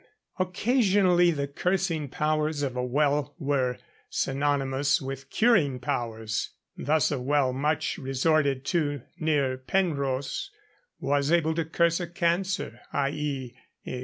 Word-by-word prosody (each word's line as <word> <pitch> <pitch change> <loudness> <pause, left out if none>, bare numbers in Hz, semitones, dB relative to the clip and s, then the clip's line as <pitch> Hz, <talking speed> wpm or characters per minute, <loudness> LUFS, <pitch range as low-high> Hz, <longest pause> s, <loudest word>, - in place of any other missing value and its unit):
Occasionally 185 -2 +3
the 140 -4 -1
cursing 175 0 -1
powers 155 +1 0
of 130 -3 -2
a 125 - -1
well 145 +2 +1
were 135 -5 0 0.3
synonymous 140 0 +1
with 135 0 -6
curing 175 - +3
powers. 115 -3 -3 0.2
Thus 155 0 +1
a 140 - -1
well 135 0 +1
much 150 +4 -1
resorted 135 0 +1
to 145 -6 0 0.2
near 140 -5 +1
Penrhos, 140 - -1 0.5
was 145 +1 +1
able 165 -2 +3
to 165 0 -1
curse 170 +1 +2
a 175 - -3
cancer, 175 - -1
i.e. 140 -3 -2
145 Hz, 115 wpm, -27 LUFS, 135-170 Hz, 0.5 s, Occasionally